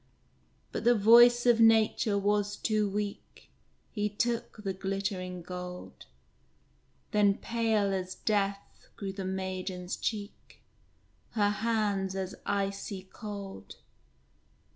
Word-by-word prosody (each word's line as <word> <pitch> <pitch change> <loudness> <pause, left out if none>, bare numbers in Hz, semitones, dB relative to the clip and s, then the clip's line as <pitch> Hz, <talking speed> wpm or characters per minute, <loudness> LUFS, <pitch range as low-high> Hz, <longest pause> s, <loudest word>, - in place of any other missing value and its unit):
But - - -4
the 240 +1 +5
voice 240 +3 +7
of 240 -2 +5
nature 220 -2 +4
was 205 0 +1
too 215 -2 0
weak; 205 0 -5 0.4
He 210 -1 -1
took 230 0 -2
the 195 -2 -2
glittering 190 -2 -3
gold! 180 0 -8 1.0
Then 205 -1 +3
pale 220 -4 0
as 185 -1 -3
death 200 -2 -2
grew 195 -2 -5
the 195 -1 -5
maiden's 185 -1 -3
cheek, 205 -2 -5 0.7
Her 205 -3 +2
hands 205 -3 0
as 190 0 -3
icy 195 -1 -2
cold. 200 -3 -8
200 Hz, 105 wpm, -30 LUFS, 190-215 Hz, 1.0 s, voice